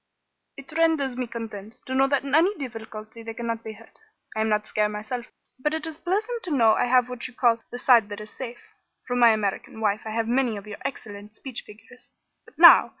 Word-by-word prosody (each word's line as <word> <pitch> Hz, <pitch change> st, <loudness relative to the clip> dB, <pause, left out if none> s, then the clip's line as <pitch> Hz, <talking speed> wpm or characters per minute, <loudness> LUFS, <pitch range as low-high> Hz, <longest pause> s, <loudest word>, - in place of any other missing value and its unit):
"It 275 Hz, +3 st, -11 dB
renders 320 Hz, -6 st, +2 dB
me 250 Hz, -1 st, -3 dB
content 225 Hz, -2 st, -8 dB
to 260 Hz, -, -5 dB
know 270 Hz, +1 st, +4 dB
that 280 Hz, -1 st, +1 dB
in 275 Hz, -1 st, -6 dB
any 350 Hz, +7 st, +4 dB
difficulty 225 Hz, -4 st, -8 dB
they 225 Hz, 0 st, -7 dB
cannot 230 Hz, -1 st, -4 dB
be 220 Hz, -, -7 dB
hurt. 225 Hz, +1 st, -18 dB, 0.4 s
I 220 Hz, -, 0 dB
am 220 Hz, -, +1 dB
not 210 Hz, 0 st, +1 dB
scare, 210 Hz, -1 st, 0 dB
myself, 215 Hz, +4 st, -5 dB, 0.3 s
but 300 Hz, +4 st, 0 dB
it 320 Hz, -1 st, -2 dB
is 320 Hz, -1 st, -5 dB
pleasant 430 Hz, +6 st, -2 dB
to 370 Hz, -, -7 dB
know 235 Hz, -7 st, +4 dB
I -, -, +1 dB
have 250 Hz, 0 st, +3 dB
what 250 Hz, -1 st, -6 dB
you 250 Hz, -, -16 dB
call 235 Hz, -2 st, +3 dB
the 245 Hz, -, -6 dB
side 240 Hz, -4 st, +4 dB
that 205 Hz, 0 st, -6 dB
is 210 Hz, 0 st, -10 dB
safe. 245 Hz, -2 st, -9 dB, 0.3 s
From 245 Hz, 0 st, -1 dB
my 235 Hz, -1 st, +8 dB
American 215 Hz, 0 st, -1 dB
wife 215 Hz, -1 st, 0 dB
I -, -, -4 dB
have 225 Hz, +1 st, -1 dB
many 245 Hz, -2 st, +1 dB
of 200 Hz, -, -9 dB
your 210 Hz, -1 st, -9 dB
excellent 210 Hz, -5 st, -7 dB
speech 260 Hz, -1 st, -6 dB
figures. 220 Hz, +4 st, -15 dB, 0.4 s
But -, -, -20 dB
now! -, -, +9 dB
235 Hz, 225 wpm, -25 LUFS, 220-265 Hz, 0.4 s, now